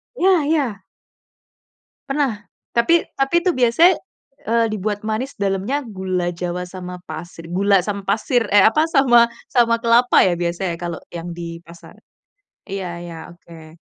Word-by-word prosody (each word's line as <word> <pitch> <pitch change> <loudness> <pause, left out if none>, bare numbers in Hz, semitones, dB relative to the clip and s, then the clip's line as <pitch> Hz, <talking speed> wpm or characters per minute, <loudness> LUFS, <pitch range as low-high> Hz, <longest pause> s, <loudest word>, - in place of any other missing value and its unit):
Iya 370 -7 +3
iya. 265 -11 -1 1.3
Pernah, 275 -7 0 0.3
tapi, 325 +9 +3 0.2
tapi 270 +5 +1
itu 365 - +3
biasanya, 255 +8 +4 0.5
eee, 230 0 +2
dibuat 210 0 -3
manis 220 +6 -3
dalamnya 200 +8 -1
gula 185 -5 -3
jawa, 180 +1 -4
sama 180 0 -8
pasir, 165 +1 -9
gula 195 0 +3
sama 200 -1 -5
pasir, 225 +1 +1
e 200 -1 +5
apa, 305 +8 +4
sama, 250 -7 +5 0.2
sama 235 -2 +3
kelapa 235 +2 +5
ya, 175 -2 +1
biasanya 170 0 -2
kalau 170 -2 -5
yang 170 0 -6
di 170 -1 -7
pasar. 170 0 -15 0.7
Iya 195 -2 -4 0.2
iya, 170 -1 -8 0.2
oke. 165 -2 -15
200 Hz, 140 wpm, -20 LUFS, 175-245 Hz, 1.3 s, e